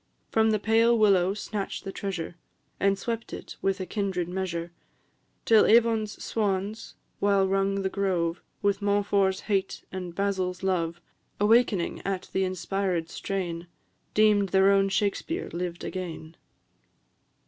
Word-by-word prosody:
From 220 0 +3
the 215 - +3
pale 225 +3 +3
willow 195 -3 +4
snatch'd 210 -1 -4
the 195 - -5
treasure, 180 -4 -4 0.4
And 195 0 +2
swept 230 +2 -4
it - - -8
with 195 0 0
a 185 - -3
kindred 190 -4 -2
measure, 175 -2 -3 0.7
Till 220 -2 +6
Avon's 225 -2 +3
swans, 205 0 -2 0.2
while 200 -1 +3
rung 195 0 +1
the - - +1
grove 185 -4 -1 0.2
With 200 0 +1
Montfort's 200 -1 +2
hate 195 -2 -1
and 180 -2 -6
Basil's 190 -2 -1
love, 170 -3 0 0.4
Awakening 210 -3 +3
at 190 -1 -3
the 190 - +1
inspiréd 185 -2 -1
strain, 175 -3 -4 0.5
Deem'd 210 -2 +4
their 190 +2 +5
own 195 0 +3
Shakspeare 210 - -1
lived 175 0 -4
again." 165 -3 -6
195 Hz, 130 wpm, -27 LUFS, 185-205 Hz, 0.7 s, Till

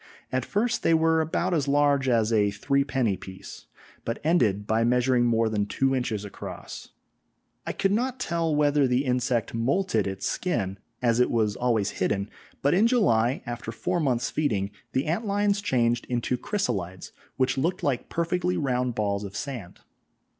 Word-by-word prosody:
At 130 -1 -1
first 235 +3 0
they 165 - +3
were 160 0 +3
about 170 +3 -1
as 145 -4 +1
large 140 -1 +3
as 115 -2 +2
a 105 -2 +3
threepenny 130 -1 0
piece, 95 -1 -11 0.4
but 115 - -3
ended 115 - +2
by 110 +2 +1
measuring 125 +1 +3
more 115 -1 +2
than 105 -2 -1
two 135 +6 +1
inches 115 -5 -2
across. 100 - -8 0.8
I - - 0
could 195 - +1
not 250 +5 0
tell 165 - 0
whether 145 -1 +3
the 125 +3 +1
insect 125 -3 0
moulted 115 - +1
its 95 0 -4
skin, 100 - -1 0.2
as 120 -1 +3
it 125 - +4
was 110 -3 +1
always 115 -5 +1
hidden, 100 +2 0 0.3
but 140 - +3
in 205 +6 +5
July, 125 - +2
after 120 -1 -5
four 175 +10 -2
months' 125 -5 0
feeding, 105 -10 0 0.2
the 130 - +1
ant 170 +9 -1
lions 205 0 +1
changed 120 - +1
into 125 0 0
chrysalides, 120 - -3 0.3
which 130 0 +1
looked 170 +7 -1
like 135 -5 -1
perfectly 180 +2 0
round 125 -4 0
balls 100 -1 -1
of 100 0 -7
sand. 120 -8 -6
125 Hz, 165 wpm, -26 LUFS, 110-160 Hz, 0.8 s, in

